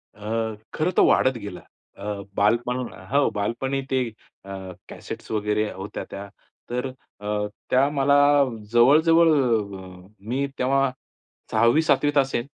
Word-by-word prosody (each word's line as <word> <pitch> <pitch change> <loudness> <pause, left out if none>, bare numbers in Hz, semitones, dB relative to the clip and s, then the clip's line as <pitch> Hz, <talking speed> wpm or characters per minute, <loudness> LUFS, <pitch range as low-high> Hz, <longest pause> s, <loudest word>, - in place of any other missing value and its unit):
अ, 110 +1 -3 0.2
खरंतर 175 +4 +1
वाढत 130 -1 +3
गेला. 100 -5 -8 0.4
अ, - - -11 0.3
बालपण 115 +4 +2 0.4
हो 140 +1 +3
बालपणी 120 +6 -1
ते 130 -1 +2 0.4
अ, 100 - -9 0.4
कॅसेट्स - - -8
वगैरे 105 0 0
होत्या 100 +2 -6
त्या. 100 +1 -7 0.4
तर 125 +2 -2 0.3
अ, 105 0 -2 0.2
त्या 135 +2 +3
मला 140 0 +3 0.6
जवळ-जवळ 160 +8 +5 1.0
मी 135 +3 0
तेव्हा 135 +1 +2 0.6
6वी-7वीत 145 +3 +3
असेन, 135 -3 +1
125 Hz, 110 wpm, -24 LUFS, 105-140 Hz, 1.0 s, जवळ-जवळ